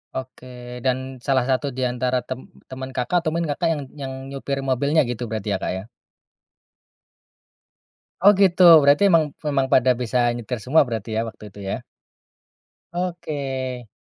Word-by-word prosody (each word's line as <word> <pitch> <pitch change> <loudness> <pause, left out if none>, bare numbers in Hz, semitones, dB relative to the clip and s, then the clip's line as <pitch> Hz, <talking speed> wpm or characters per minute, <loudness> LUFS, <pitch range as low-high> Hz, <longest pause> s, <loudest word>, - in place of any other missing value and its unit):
Oke, 125 -2 -8
dan 130 -1 -2
salah 130 -3 +1
satu 135 +1 0
di 130 0 -1
antara 125 +1 0
tem 130 0 -5 0.2
teman 130 0 -7
Kakak 130 +8 0
atau 155 - 0
mungkin 170 +1 -1
Kakak 150 +4 -1
yang 155 -3 -2 0.2
yang 135 -1 -4
nyupir 140 0 -4
mobilnya 135 +2 +1
gitu 120 0 -4
berarti 105 -2 -2
ya, - - 0
Kak, - - -1
ya? 95 +1 -4 2.4
Oh, 200 +3 +7
gitu, 185 -2 +4 0.2
berarti 145 +6 +5
memang 160 -4 +3 0.2
memang 135 -2 +1
pada 130 0 +5
bisa 125 +1 -1 0.2
nyetir 120 0 -4
semua 140 +9 +4
berarti 115 -2 -4
ya, - - +2
waktu 110 - -16
itu, 105 - -14
ya? - - -3 1.1
Oke. 140 -8 -4
130 Hz, 155 wpm, -22 LUFS, 125-145 Hz, 2.4 s, Oh